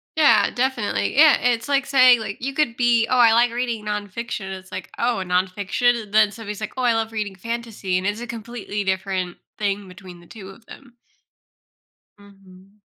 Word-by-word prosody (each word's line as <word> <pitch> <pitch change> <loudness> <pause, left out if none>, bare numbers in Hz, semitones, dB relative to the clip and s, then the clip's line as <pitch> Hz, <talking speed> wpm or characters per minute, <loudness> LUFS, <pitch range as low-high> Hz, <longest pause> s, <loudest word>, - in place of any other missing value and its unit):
Yeah, 310 -2 +4
definitely, 245 -4 -1
yeah, 300 +1 +7
it's 240 0 0
like 280 -1 +2
saying, 255 -3 +6
like, 210 -1 -6
you 275 +1 -2
could 275 -6 0
be, 235 -2 +2
"Oh, 255 - +1
I 230 -2 +6
like 235 +1 +3
reading 235 -3 -3
nonfiction." 210 0 -5
It's 190 0 -16
like, 185 - -7
"Oh, 235 0 0
nonfiction?" 200 +5 0
Then 210 -1 +4
somebody's 210 -1 -7
like, 215 - -5
"Oh, 260 - -3
I 245 -2 +3
love 225 0 -1
reading 210 -3 -4
fantasy," 225 -3 -4
and 185 +2 -2
it's 205 +2 -2
a 240 - -7
completely 230 -3 -5
different 190 -2 -2 0.2
thing 200 -1 -2
between 180 -1 -13
the 175 - -18
2 195 -2 -11
of 220 +4 -15
them. 245 -1 -15 1.2
Mhm. 195 0 -19
220 Hz, 180 wpm, -22 LUFS, 195-240 Hz, 1.2 s, yeah